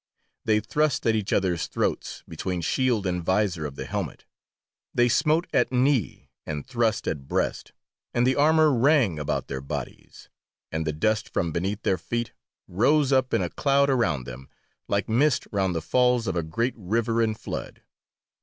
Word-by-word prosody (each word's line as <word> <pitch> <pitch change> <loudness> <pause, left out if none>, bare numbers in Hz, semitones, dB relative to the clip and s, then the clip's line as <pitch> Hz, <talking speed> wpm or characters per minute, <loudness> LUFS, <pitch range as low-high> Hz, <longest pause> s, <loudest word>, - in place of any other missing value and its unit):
They 110 -1 +3
thrust 150 +6 0
at 115 - +4
each 105 -3 -2
others' 90 -4 +1
throats - - -2
between 90 -2 -3
shield 120 +3 +1
and 90 -1 -1
visor 95 -4 0
of 70 - -10
the - - -6
helmet, - - -4 0.7
they 120 0 +4
smote 155 +7 +2
at - - +2
knee, 130 - 0
and 75 -2 -5
thrust 115 -3 0
at 70 -3 -3
breast, - - -2 0.4
and 120 0 +1
the 130 +1 +3
armour 155 0 +4
rang 125 - +3
about 75 0 -2
their 65 -1 -4
bodies, 70 - -7 0.4
and 80 0 -2
the - - +1
dust 110 +8 0
from 85 - -1
beneath 95 +6 -2
their 95 - +1
feet 120 0 -3 0.3
rose 140 +9 +2
up 130 -1 +2
in - - +1
a - - -2
cloud 140 0 +2
around 80 - +1
them, 65 +2 -9 0.4
like 100 -1 0
mist 130 +5 +2
round 95 -3 0
the 80 - -2
falls 125 -2 +2
of 95 - -2
a 85 - +1
great 115 +11 -1
river 115 +3 0
in 110 -1 +1
flood. - - -7
110 Hz, 175 wpm, -25 LUFS, 90-130 Hz, 0.7 s, at